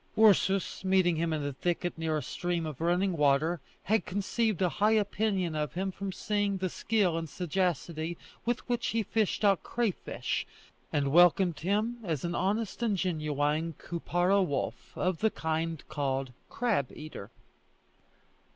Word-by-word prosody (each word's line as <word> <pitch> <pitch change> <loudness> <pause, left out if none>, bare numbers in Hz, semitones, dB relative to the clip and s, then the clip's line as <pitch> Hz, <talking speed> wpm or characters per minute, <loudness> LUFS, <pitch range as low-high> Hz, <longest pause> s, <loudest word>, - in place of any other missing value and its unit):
Ursus 195 -4 +4
meeting 185 -2 +3
him 165 0 0
in 150 -2 -1
a 145 - -2
thicket 175 +5 -1
near 160 -1 -1
a 150 - -3
stream 175 -2 -2
of 155 -2 -6
running 175 +2 +2
water, 150 +2 +2 0.2
had 220 +1 +2
conceived 205 +1 -1
a 185 - +3
high 215 +1 +5
opinion 200 -5 0
of 150 -3 -2
him 190 +2 -1
from 195 +1 -5
seeing 205 0 0
the 185 0 -1
skill 190 -5 +1
and 165 -1 -6
sagacity 170 -1 -1 0.3
with 240 +1 -2
which 240 -1 0
he 225 0 0
fished 215 0 0
out 195 -3 +4
crayfish, 230 -6 -2 0.4
and 140 -2 +1
welcomed 175 +1 +5
him 210 +7 0
as 160 -6 -2
an 170 - -2
honest 205 +5 -1
and 220 -4 +1
genuine 155 -2 0
Koupara 175 +4 +1
wolf 145 -7 -3
of 185 -2 0
the 220 - +3
kind 160 -2 -2
called 135 -3 -2 0.2
crab 215 - 0
eater. 150 -9 -8
175 Hz, 150 wpm, -30 LUFS, 160-200 Hz, 0.4 s, high